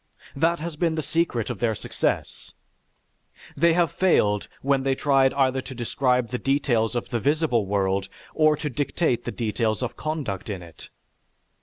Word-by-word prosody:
That 165 +4 +2
has 160 -1 -5
been 165 -1 +1
the 155 - -2
secret 140 -8 0
of - - -6
their 115 -2 +1
success. - - -3 1.0
They 170 +3 +4
have 170 0 +2
failed 105 - +2 0.2
when 135 0 +2
they 135 0 +1
tried 135 -1 +3
either 130 -1 +2
to 130 - -9
describe 125 0 0
the 125 - -3
details 125 -5 +1
of 120 - -3
the 120 - -1
visible 140 -5 +1
world 95 -1 0 0.2
or 155 -1 +4
to 150 - -3
dictate 135 -1 0
the - - -2
details 110 0 -1
of 125 - -3
conduct 140 - -4
in 95 -4 -4
it. 85 -3 -13
130 Hz, 165 wpm, -24 LUFS, 115-150 Hz, 1.0 s, They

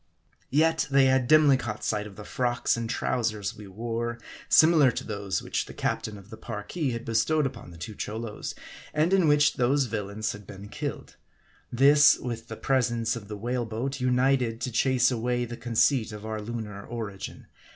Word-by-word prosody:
Yet 160 +4 +2
they 135 -1 +5
had 130 -1 +3
dimly 150 -2 +6
caught 110 -4 -5
sight 105 -1 -1
of 100 - -13
the 105 - -9
frocks 120 +2 0
and 115 -1 -4
trow 125 +2 -1
sers 110 -2 -2
we 105 -1 -11
wore, 115 +3 -3 0.3
similar 155 -4 +6
to 120 - -4
those 100 -3 -3
which - - -2
the - - -10
captain 105 -1 -2
of 100 +3 -15
the 110 - -8
Parki 115 +8 -4
had 115 0 -5
bestowed 125 +7 +2
upon 125 -7 -6
the 85 - -12
two 85 +6 -7
Cholos, 110 +1 -5 0.4
and 160 +5 +2
in 185 -4 +4
which 150 0 +4
those 130 +3 +2
vil 110 -4 -3
lains 110 +2 -3
had 105 -1 -10
been 100 +1 -10
killed. - - -6 0.5
This, 145 +4 +6
with 115 -2 -6
the 110 - -7
presence 120 -4 +1
of 110 -3 -8
the 105 0 -6
whale 120 +2 -2
boat, 130 +5 -3
united 125 -2 +2
to 125 - -2
chase 125 +1 +3
away 120 +1 -1
the 120 0 -7
conceit 120 0 +1
of 105 0 -8
our 110 -1 -4
lunar 105 -2 -6
origin. 110 -5 -7
115 Hz, 190 wpm, -27 LUFS, 110-130 Hz, 0.5 s, dimly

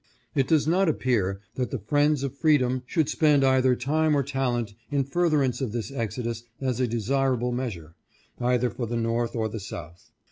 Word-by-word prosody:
" - - -38
It 135 -2 +2
does 155 -3 +3
not 180 +3 +3
appear 105 -10 0
that 125 -1 -2
the 135 - -2
friends 145 +6 +1
of 140 -1 -3
freedom 130 -4 +2
should 160 -2 +1
spend 150 -3 +3
either 130 -1 +4
time 150 +4 +1
or 140 - +2
talent 125 -5 -1 0.2
in 140 -1 +1
furtherance 145 -3 +1
of 120 -5 -2
this 120 +2 -3
exodus 115 -2 -3 0.2
as 130 -3 -1
a 125 - +2
desirable 125 +2 0
measure, 105 -11 -4 0.5
either 125 0 +1
for 120 - -4
the 120 +1 -2
North 115 +1 -1
or 110 -1 0
the 110 +1 -5
South. 85 -3 -9
125 Hz, 185 wpm, -26 LUFS, 115-140 Hz, 0.5 s, either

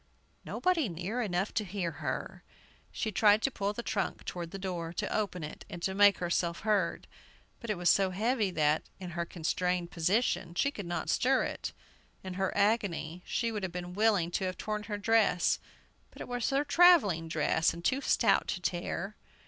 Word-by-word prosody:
Nobody 340 - 0
near 180 +8 -3
enough 195 -2 -1
to 220 - 0
hear! 180 -3 -4 0.5
She 220 - -2
tried 210 +2 +4
to 270 - +2
pull 200 -4 -1
the 235 +3 -6
trunk 200 -4 -2
toward 175 -2 -5
the 195 - -7
door, 180 -4 -4
to - - -2
open 200 -5 -2
it 150 - -7
and 175 -2 -3
make 205 -1 +6
herself 170 -1 -1
heard; 205 -5 0 0.5
but 235 - -8
it 210 - 0
was 175 0 -1
so 195 +1 +4
heavy 215 +3 0
that, 155 -3 +2 0.2
in 180 -2 -7
her 170 0 -2
constrained 175 +1 -1
position, 180 0 0
she 280 +9 +2
could 205 -10 -7
not 175 - -2
stir 260 +1 +3
it. - - -4 0.5
In 185 -1 -5
her 190 0 -1
agony, 200 -6 0
she 230 -1 0
would 210 -2 -3
have 190 -2 -3
been 180 0 -6
willing 200 -4 +2
to 190 - -1
have 185 0 -3
torn 215 -1 -3
her 205 -1 -3
dress; 205 -4 +3 0.5
but - - -16
it - - -6
was 245 -2 -1
her 275 +1 +2
travelling 285 - +5
dress, 160 +1 +2
and 170 +1 -9
too 265 +2 +2
stout 235 -4 +3
to - - -2
tear. 180 +3 -3
195 Hz, 185 wpm, -31 LUFS, 175-220 Hz, 0.5 s, make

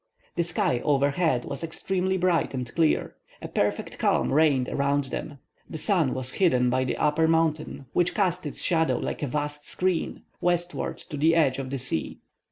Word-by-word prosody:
The 175 - +1
sky 165 -7 0
overhead 140 0 +1
was - - -5
extremely 190 +3 -1
bright 175 -5 +1
and 125 -1 -3
clear. 165 -2 +1 0.3
A - - -6
perfect - - -1
calm - - +2
reigned 140 -4 +3
around 140 +1 +1
them. 145 - -5 0.3
The 160 - -5
sun 165 -4 +1
was 130 0 -4
hidden 125 -8 +3
by 130 +1 +1
the - - -2
upper 150 +2 +2
mountain, 160 -3 0
which 175 0 +1
cast 180 -5 0
its 145 - -6
shadow, 165 -2 +2
like - - -4
a 145 - -1
vast 145 +2 -3
screen, 180 -2 -1 0.2
westward 175 0 -1
to 150 - -3
the 160 +3 +4
edge 140 -5 +3
of 130 -1 -4
the 135 - -2
sea. 125 -11 -3
155 Hz, 175 wpm, -26 LUFS, 135-170 Hz, 0.3 s, the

